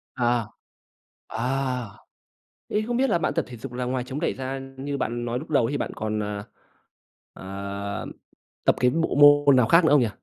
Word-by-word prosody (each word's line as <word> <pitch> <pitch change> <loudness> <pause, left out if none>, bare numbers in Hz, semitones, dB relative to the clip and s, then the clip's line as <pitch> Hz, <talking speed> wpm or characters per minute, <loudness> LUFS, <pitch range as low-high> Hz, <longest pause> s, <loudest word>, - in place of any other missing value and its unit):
À. 120 -3 +1 0.8
À! 125 +1 -2 0.8
Thế 210 - 0
không 240 0 0
biết 265 +1 +2
là - - +3
bạn - - -1
tập 165 - 0
thể 120 - -9
dục 125 +2 -8
là 125 0 -3
ngoài 125 0 -1
chống 130 +3 -5
đẩy 165 - 0
ra 135 +1 -4 0.2
như 140 +1 -3
bạn 120 -2 -2
nói 120 +1 -2
lúc 160 - -10
đầu 135 -6 +3
ấy, 115 - -2
thì 145 - -1
bạn - - -3
còn, 110 0 -2
à, 105 0 -4 0.9
à, - - -12 1.2
tập - - +4
cái 125 - +4
bộ 165 +4 0 0.3
môn 140 -2 +7
nào 125 -3 +4
khác 165 +6 +5
nữa 160 - +4
không 145 - +6
nhỉ? 120 - +2
130 Hz, 205 wpm, -25 LUFS, 120-145 Hz, 1.2 s, môn